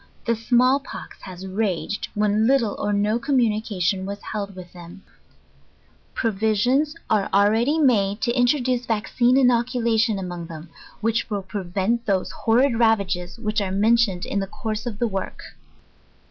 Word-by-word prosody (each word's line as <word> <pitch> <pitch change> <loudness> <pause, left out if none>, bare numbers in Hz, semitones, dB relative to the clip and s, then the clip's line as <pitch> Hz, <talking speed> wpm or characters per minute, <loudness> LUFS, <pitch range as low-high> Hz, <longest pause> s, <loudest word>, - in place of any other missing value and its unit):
The 235 - +1
small 250 +4 +3
pox 275 - -10
has 185 -1 -9
raged, 195 0 -2
when 210 +1 +2
lit'le 245 -6 +2
or 205 - -1
no 210 +3 +1
communication 215 - 0
was 200 +1 -5
held 200 -2 -5
with 180 -1 -11
them. 175 +2 -12 1.1
Provisions 225 +8 +1
are 210 -3 +1
already 220 +9 +3
made 210 -9 +2
to 240 - +1
introduce 250 -1 +1
vaccine 240 +3 +1
inoccula 250 -1 +2
a - - -5
PREFACE. 225 -1 +3
tion 225 -3 +1
among 175 -3 -5
thorn, 160 -1 -10 0.3
which 225 +1 0
will 205 -2 -3
prevent 195 +4 -2
those 190 -2 0
horrid 235 +1 +2
ravage* 215 -5 +3 0.2
which 215 -1 -1
arc 190 -1 -2
mentioned 210 -3 +2
in 200 - -2
the 195 - -2
course 215 +3 -5
of 220 -4 -5
the 235 - 0
work. 195 -3 -5
215 Hz, 155 wpm, -23 LUFS, 195-235 Hz, 1.1 s, small